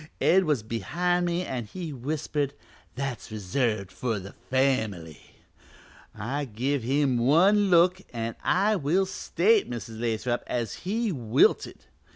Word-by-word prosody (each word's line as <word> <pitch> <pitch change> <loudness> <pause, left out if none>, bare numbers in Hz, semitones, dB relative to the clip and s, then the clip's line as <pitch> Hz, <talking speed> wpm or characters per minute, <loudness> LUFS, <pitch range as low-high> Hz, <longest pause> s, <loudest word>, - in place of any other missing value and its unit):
Ed 190 +2 +4
was 145 -8 +1
behind 175 +10 0
me 175 +1 -1
an' 125 -3 -4
he 165 - -6
whispered 145 +1 -2 0.4
'That's 135 -5 -4
reserved 105 -1 -1
for 115 -4 -2
the 100 0 -8 0.2
family.' 110 - -1 0.8
I 135 +7 -3
give 130 +4 -1
him 135 +1 +1
one 190 - +4
look 180 +1 +4
an' 115 -1 -4
I 205 +3 +2
will 175 +5 +1
state, 195 +2 +1
Mrs. 115 -2 -6
Lathrop, 120 +1 -1
as 120 -4 -2 0.2
he 225 +1 0
wilted. 120 -8 +1
135 Hz, 130 wpm, -27 LUFS, 115-175 Hz, 0.8 s, Ed